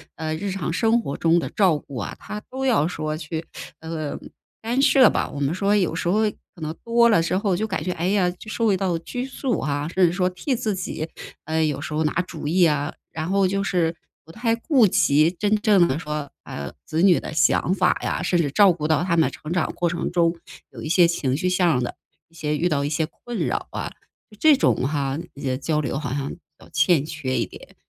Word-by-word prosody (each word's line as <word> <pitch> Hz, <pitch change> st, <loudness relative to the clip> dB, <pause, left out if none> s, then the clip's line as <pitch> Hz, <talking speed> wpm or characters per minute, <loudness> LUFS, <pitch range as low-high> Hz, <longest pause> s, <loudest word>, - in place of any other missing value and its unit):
呃， 155 Hz, -1 st, -3 dB
日 200 Hz, +5 st, -3 dB
常 180 Hz, -3 st, -3 dB
生 225 Hz, +4 st, +3 dB
活 140 Hz, -, -4 dB
中 165 Hz, +1 st, +3 dB
的 -, -, 0 dB
照 185 Hz, -7 st, +3 dB
顾 140 Hz, -2 st, -10 dB
啊， 105 Hz, -, -4 dB
他 210 Hz, -, -7 dB
都 265 Hz, +1 st, -4 dB
要 225 Hz, -, +3 dB
说 155 Hz, -3 st, -3 dB
去， 160 Hz, +1 st, -5 dB, 0.4 s
呃， 160 Hz, -2 st, -4 dB, 0.4 s
干 240 Hz, +4 st, 0 dB
涉 270 Hz, -2 st, +6 dB
吧。 -, -, 0 dB
我 145 Hz, -, -7 dB
们 140 Hz, +2 st, 0 dB
说 200 Hz, +3 st, +1 dB
有 185 Hz, -6 st, +1 dB
时 165 Hz, -, -2 dB
候 205 Hz, +5 st, +3 dB, 0.3 s
可 170 Hz, -, -14 dB
能 155 Hz, +1 st, -4 dB
多 235 Hz, 0 st, +4 dB
了 210 Hz, -7 st, +4 dB
之 170 Hz, +3 st, 0 dB
后 195 Hz, -3 st, +1 dB
就 215 Hz, +4 st, -1 dB
感 190 Hz, -, -3 dB
觉， 180 Hz, -, -2 dB
哎 175 Hz, 0 st, -2 dB
呀， 195 Hz, -2 st, +2 dB
就 200 Hz, +4 st, -12 dB
受 220 Hz, -3 st, +1 dB
到 185 Hz, -3 st, 0 dB
拘 245 Hz, +9 st, -5 dB
束 265 Hz, -1 st, -2 dB
啊， 145 Hz, 0 st, -2 dB
甚 180 Hz, 0 st, +3 dB
至 165 Hz, -, 0 dB
说 180 Hz, 0 st, +1 dB
替 185 Hz, +9 st, -2 dB
自 215 Hz, -2 st, -1 dB
己， 165 Hz, -3 st, -4 dB, 0.4 s
呃， 160 Hz, +1 st, 0 dB
有 150 Hz, -3 st, 0 dB
时 155 Hz, 0 st, -5 dB
候 155 Hz, -, +1 dB
拿 155 Hz, -, 0 dB
主 160 Hz, -4 st, -7 dB
意 175 Hz, +3 st, +4 dB
啊， 150 Hz, -1 st, 0 dB, 0.2 s
然 160 Hz, +1 st, -4 dB
后 195 Hz, 0 st, +3 dB
就 195 Hz, +1 st, -1 dB
是 170 Hz, -4 st, 0 dB, 0.3 s
不 165 Hz, -, -13 dB
太 230 Hz, +3 st, 0 dB
顾 245 Hz, -2 st, +3 dB
及 155 Hz, -2 st, +4 dB
真 205 Hz, +4 st, +1 dB
正 200 Hz, -6 st, +5 dB
的 130 Hz, -, -1 dB
说， 150 Hz, -3 st, -4 dB
啊， 70 Hz, -2 st, -6 dB
子 160 Hz, -, -1 dB
女 185 Hz, -2 st, +5 dB
的 -, -, -7 dB
想 160 Hz, +3 st, +3 dB
法 185 Hz, -2 st, +2 dB
呀， -, -, -1 dB
甚 175 Hz, -, +1 dB
至 145 Hz, -, 0 dB
照 195 Hz, +3 st, +6 dB
顾 155 Hz, -2 st, -3 dB
到 155 Hz, 0 st, +2 dB
他 175 Hz, -2 st, +1 dB
们 160 Hz, -2 st, +3 dB
成 155 Hz, -, -8 dB
长 175 Hz, -3 st, 0 dB
过 175 Hz, -, 0 dB
程 170 Hz, -, -3 dB
中 170 Hz, -1 st, +2 dB, 0.4 s
有 -, -, -10 dB
一 155 Hz, -, -5 dB
些 175 Hz, +1 st, +5 dB
情 140 Hz, -5 st, -1 dB
绪 185 Hz, -, -1 dB
向 175 Hz, -8 st, +2 dB
的， 120 Hz, -, -4 dB, 0.3 s
一 165 Hz, -, -31 dB
些 150 Hz, -2 st, -2 dB
遇 175 Hz, +4 st, +1 dB
到 145 Hz, -4 st, 0 dB
一 145 Hz, -, -1 dB
些 155 Hz, +1 st, 0 dB
困 235 Hz, +8 st, -8 dB
扰 -, -, -1 dB
啊， -, -, -4 dB, 0.5 s
这 310 Hz, -2 st, +6 dB
种 -, -, +3 dB
哈， 140 Hz, -1 st, -1 dB, 0.2 s
一 140 Hz, -, -10 dB
些 130 Hz, -3 st, -1 dB
交 150 Hz, +3 st, -1 dB
流 140 Hz, -2 st, -2 dB
好 140 Hz, -3 st, -4 dB
像 140 Hz, 0 st, -2 dB
比 -, -, -7 dB, 0.2 s
较 -, -, -16 dB
欠 155 Hz, -1 st, +3 dB
缺 150 Hz, -4 st, -3 dB
一 -, -, +1 dB
点。 -, -, -14 dB
170 Hz, 255 characters per minute, -23 LUFS, 155-195 Hz, 0.5 s, 涉